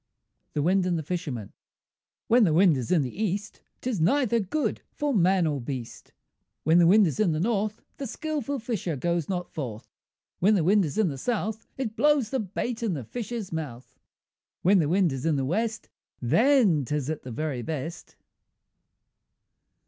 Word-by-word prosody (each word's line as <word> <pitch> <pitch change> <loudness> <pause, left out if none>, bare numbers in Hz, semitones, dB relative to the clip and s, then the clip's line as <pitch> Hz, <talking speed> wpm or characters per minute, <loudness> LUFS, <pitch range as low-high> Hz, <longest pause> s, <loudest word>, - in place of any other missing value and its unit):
THE 145 - 0
WIND 185 +2 +2
AND 175 -2 +1
THE 160 - -3
FISHERMAN 145 - -4 0.7
When 240 +1 +5
the 160 -6 +3
wind 175 -2 +5
is 125 -4 -3
in 165 -5 +4
the 135 - -4
East, 205 +1 -3 0.2
'Tis 240 -9 -2
neither 235 - +3
good 225 +10 -1
for 295 -2 -1
man 185 -3 +3
or 145 -4 -1
beast; 120 -1 -7 0.5
When 160 +3 +5
the 170 - +6
wind 205 +3 +6
is 165 +3 -2
in 195 -7 +3
the 155 - -1
North, 215 +2 -1
The 275 - -4
skilful 285 0 -3
fisher 220 - -3
goes 170 +3 -1
not 180 -2 -3
forth; 120 -7 -6 0.5
When 210 +4 +4
the 180 - +2
wind 195 +3 +4
is 145 - -5
in 215 -5 +3
the 135 -2 -6
South, 220 - -2
It 235 -5 -3
blows 285 -2 +3
the 265 - 0
bait 220 +4 -3
in 215 -7 0
the 135 - -5
fish's 230 - -5
mouth; 135 -6 -6 0.6
When 190 +2 +5
the 150 -3 +1
wind 180 -1 +3
is 135 -1 -5
in 165 -2 +2
the 135 -1 0
West, 220 - -1 0.3
Then 195 - +4
'tis 145 +1 -2
at 155 - -4
the 130 - -9
very 140 0 -3
best. 160 +4 -6
180 Hz, 180 wpm, -27 LUFS, 150-220 Hz, 0.7 s, the